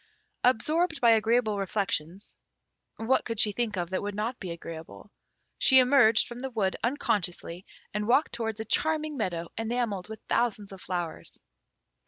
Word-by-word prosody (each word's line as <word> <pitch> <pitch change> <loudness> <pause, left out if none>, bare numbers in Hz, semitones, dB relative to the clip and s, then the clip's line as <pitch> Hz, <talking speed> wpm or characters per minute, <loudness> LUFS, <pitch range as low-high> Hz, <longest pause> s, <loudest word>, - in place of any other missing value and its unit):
Absorbed 310 +7 +2
by 235 -3 +5
agreeable 220 -1 +2
reflections, 195 -2 -3 0.6
(what 235 +4 +1
could 230 -3 -4
she 210 - +5
think 215 -1 -2
of 175 0 -3
that 185 - -1
would 205 0 -4
not 225 +4 -3
be 185 - -6
agreeable?) 165 +3 -9 0.5
she 265 - +6
emerged 250 -4 +5
from 240 0 -8
the 265 +1 -4
wood 210 -6 -1
unconsciously, 200 - -2 0.3
and 210 0 -2
walked 265 +6 +3
towards 225 -2 -3
a 220 - -4
charming 310 +4 0
meadow 175 -8 -3
enamelled 225 -4 -2
with 220 - -7
thousands 215 -4 0
of 190 -1 -10
flowers. 175 -3 -5
220 Hz, 155 wpm, -28 LUFS, 195-245 Hz, 0.6 s, she